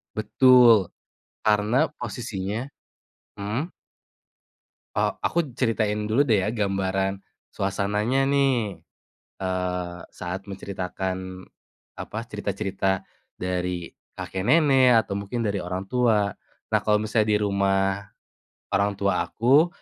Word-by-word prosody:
Betul. 115 -2 +5 0.5
Karena, 110 +8 +2
posisinya 110 -2 -4 0.8
mhm? 115 - -3 1.2
E - - +2 0.2
aku 170 - +1 0.2
ceritain 105 -3 0
dulu 115 +6 +3
deh 105 -8 +2
ya, - - +1
gambaran 95 -2 -1 0.3
suasananya, 105 +7 0
nih. 130 -7 +1 0.6
Eee, 90 -1 -2 0.2
saat 90 +2 -5
menceritakan, 95 -1 -5 0.5
apa, 110 - -5
cerita-cerita 100 -3 -2 0.3
dari 90 -1 -3 0.2
kakek 95 +1 -4
nenek, 130 -5 +5
atau 100 - -5
mungkin 100 +4 -3
dari 100 -2 0
orang 90 +2 -4
tua. 110 -5 +2 0.4
Nah, - - +3
kalau 105 -1 +4
misalnya 110 0 +1
di - - +1
rumah 95 -1 +1 0.7
orang 100 0 +2
tua 100 -2 +1
aku, 135 +8 +4
100 Hz, 105 wpm, -25 LUFS, 95-115 Hz, 1.2 s, Betul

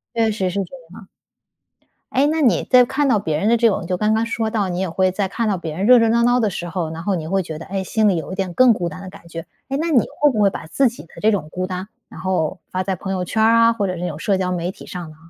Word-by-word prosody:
确 225 -1 +2
实 190 -3 -1
是 200 +2 -2
这 180 - -11 0.2
样。 190 - -13 1.1
诶， 270 +3 +3
那 315 +2 0
你 255 -6 +3
在 250 -1 +5
看 275 +2 0
到 230 -6 +3
别 160 -6 -2
人 205 +7 0
的 235 - +4
这 230 0 +4
种 180 -4 -2
就 180 - -1
刚 215 0 +2
刚 225 +1 +1
说 225 -1 -2
到， 210 -4 -1
你 175 - -3
也 190 - -1
会 185 +3 +1
在 195 0 -1
看 230 +4 -2
到 200 -3 0
别 160 -3 -6
人 190 - -2
热 250 +2 +7
热 230 - +3
闹 235 +1 +3
闹 245 +1 +3
的 220 - +2
时 175 -2 -5
候， 170 -2 -3
然 165 +1 -6
后 195 +2 0
你 160 -3 -3
会 195 +1 +1
觉 160 -2 -7
得， 160 - -9
哎， 195 0 -3
心 215 +2 +2
里 190 - +2
有 165 - -5
一 - - -3
点 190 -3 -3
更 255 -1 +6
孤 175 -5 -2
单 170 +4 -9
的 190 - -8
感 185 -3 -15
觉。 165 0 -6 0.3
诶， 275 - -2
那 330 +2 -1
你 255 -8 +3
会 295 -1 +4
不 215 - -1
会 200 - +5
把 190 - -6
自 260 +11 +2
己 235 - -10
的 - - -19
这 220 - +3
种 180 -8 -2
孤 185 +2 -3
单， 185 +1 -5 0.2
然 - - -12
后 180 -4 -1
发 185 - -1
在 190 0 -2
朋 190 +2 -5
友 180 -1 -2
圈 220 +4 0
儿 225 +1 +5
啊， 230 0 +5
或 205 -3 -1
者 185 - -2
这 180 - -3
种 155 -2 -6
社 195 +2 0
交 185 -1 -1
媒 180 0 -2
体 - - -13
上 175 -3 -7
呢？ 155 - -15
195 Hz, 340 characters per minute, -20 LUFS, 180-230 Hz, 1.1 s, 热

